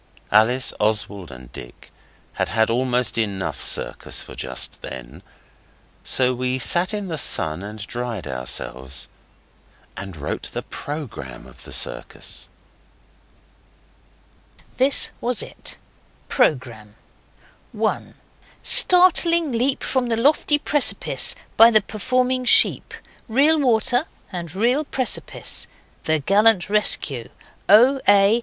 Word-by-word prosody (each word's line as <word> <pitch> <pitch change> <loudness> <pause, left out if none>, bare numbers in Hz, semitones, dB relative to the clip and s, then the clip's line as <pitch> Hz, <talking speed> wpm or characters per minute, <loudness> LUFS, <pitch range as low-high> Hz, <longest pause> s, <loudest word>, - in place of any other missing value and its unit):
Alice, 120 +5 +2
Oswald 105 -5 -1
and 65 0 -13
Dick - - -13 0.4
had - - -3
had 110 0 0
almost 125 -1 -1
enough 100 -4 -4
circus - - -1
for - - -13
just - - -2
then, 65 -1 -10 0.8
so 130 -1 0
we 125 +1 -3
sat 175 - +2
in 205 -2 -5
the 160 -3 -2
sun 80 -6 +2
and 105 +1 -8
dried 120 -4 -6
ourselves 65 0 -3 0.9
and 95 -4 -9
wrote 75 0 -6
the - - -5
programme 130 - -8
of - - -15
the - - -12
circus. - - -3 2.3
This 265 +2 +4
was 245 -1 -1
it: - - -9 0.5
PROGRAMME 120 - -1 0.8
1. - - -3 0.5
Startling 340 -3 +5
leap 250 +3 0
from 260 -2 -1
the 230 -1 -1
lofty 290 +4 +3
precipice 295 -1 +2 0.2
by 225 +1 +8
the 220 -2 +5
performing 255 +5 -2
sheep. 245 - +4 0.3
Real 290 +7 +2
water, 245 +2 +1 0.2
and 175 -2 -7
real 245 +9 0
precipice. 260 -4 -2 0.4
The 160 0 +1
gallant 200 +4 +2
rescue. 145 - -1 0.4
O. 250 +7 +5
A. 205 +3 +4
170 Hz, 110 wpm, -20 LUFS, -, 2.3 s, by